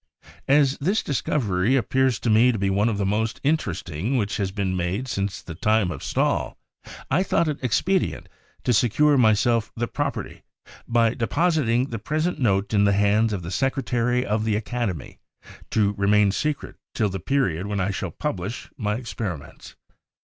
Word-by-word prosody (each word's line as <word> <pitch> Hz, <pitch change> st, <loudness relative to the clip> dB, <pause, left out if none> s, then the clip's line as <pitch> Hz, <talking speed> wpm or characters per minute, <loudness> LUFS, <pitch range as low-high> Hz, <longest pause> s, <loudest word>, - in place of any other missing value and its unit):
As 140 Hz, -1 st, +3 dB
this 190 Hz, +9 st, +1 dB
discovery 120 Hz, -6 st, 0 dB
appears 130 Hz, -1 st, +2 dB
to 115 Hz, -, +1 dB
me 115 Hz, +4 st, +5 dB
to 115 Hz, -, -3 dB
be 100 Hz, -1 st, 0 dB
one 100 Hz, +4 st, +2 dB
of 110 Hz, -, -2 dB
the 100 Hz, -, 0 dB
most 110 Hz, +3 st, -1 dB
in 150 Hz, +3 st, +4 dB
teresting 95 Hz, -, -3 dB
which 105 Hz, -3 st, -1 dB
has 100 Hz, -2 st, -1 dB
been 95 Hz, -1 st, -2 dB
made 90 Hz, +8 st, -2 dB
since 100 Hz, -6 st, -3 dB
the 85 Hz, -, -7 dB
time 105 Hz, +2 st, +1 dB
of 75 Hz, -, -7 dB
Stahl, -, -, 0 dB, 0.5 s
I 155 Hz, +7 st, +3 dB
thought 175 Hz, -3 st, +1 dB
it 150 Hz, -3 st, -3 dB
expedient 180 Hz, -, 0 dB, 0.4 s
to 125 Hz, -, +2 dB
secure 125 Hz, +7 st, +3 dB
to 140 Hz, -, +4 dB
myself 115 Hz, +1 st, +2 dB
the 120 Hz, +1 st, -2 dB
property, 145 Hz, +2 st, -4 dB, 0.5 s
by 115 Hz, -1 st, +3 dB
depositing 130 Hz, -, +1 dB
the 115 Hz, -, -3 dB
present 155 Hz, -, -1 dB
note 100 Hz, -4 st, +1 dB
in 100 Hz, -1 st, +4 dB
the 100 Hz, -, +3 dB
hands 105 Hz, +3 st, +3 dB
of 95 Hz, -4 st, -3 dB
the 85 Hz, -, -6 dB
secretary 125 Hz, 0 st, 0 dB
of 105 Hz, +1 st, 0 dB
the 110 Hz, -1 st, +1 dB
Academy, 110 Hz, -, -4 dB, 0.5 s
to 105 Hz, -2 st, +2 dB
remain 100 Hz, 0 st, +3 dB
secret 150 Hz, +8 st, -3 dB, 0.2 s
till 110 Hz, -3 st, +1 dB
the 95 Hz, 0 st, -4 dB
period 95 Hz, -, 0 dB
when 105 Hz, 0 st, -2 dB
I 95 Hz, +2 st, 0 dB
shall -, -, -3 dB
publish 95 Hz, +7 st, -5 dB
my 105 Hz, -2 st, -1 dB
experiments. 110 Hz, -, -6 dB
110 Hz, 175 wpm, -24 LUFS, 100-130 Hz, 0.5 s, me